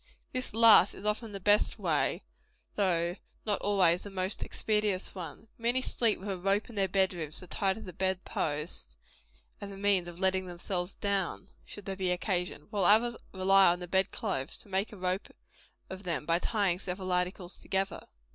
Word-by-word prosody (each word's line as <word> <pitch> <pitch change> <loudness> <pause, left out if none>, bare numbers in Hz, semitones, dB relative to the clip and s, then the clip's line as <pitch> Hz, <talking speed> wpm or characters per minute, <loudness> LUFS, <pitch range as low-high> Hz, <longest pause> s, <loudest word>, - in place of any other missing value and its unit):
This 255 0 -2
last 225 -4 +8
is 200 - -10
often 210 +1 -1
the 200 - -5
best 205 +2 +3
way, - - 0 0.5
though 175 -2 +1 0.3
not 205 -3 0
always 185 -4 +3
the 205 - -8
most 190 0 -3
expeditious 210 -3 -1
one. 185 +4 -8
Many 240 +2 +1
sleep 230 -5 +1
with 195 - -8
a 190 - -2
rope 195 +5 0
in - - -12
their 195 -1 +2
bed 190 0 +2
rooms 155 -3 -1
to - - -5
tie 190 +2 0
to 220 - -9
the 180 - -8
bed 190 +1 -1
post, 145 - -4 0.6
as 200 -1 -6
a 195 - -9
means 195 -3 +2
of 175 0 -8
letting 190 -1 +2
themselves 175 +1 -3
down, 195 -1 -1 0.2
should 205 - -10
there 195 - -3
be 190 -1 -1
occasion; 180 -3 -2
while 200 -4 +1
others 230 +5 +5 0.2
rely 195 +1 +5
on 175 0 +4
the 180 - -6
bed 190 +2 +2
clothes 140 -11 -3
to - - -16
make 195 +2 -1
a 210 - -10
rope 185 +1 -2 0.6
of 190 0 -7
them 170 -5 -3
by 165 +1 +2
tying 195 -4 0
several 185 0 -4
articles 180 0 -2
together. 195 0 -2
190 Hz, 190 wpm, -30 LUFS, 180-205 Hz, 0.6 s, last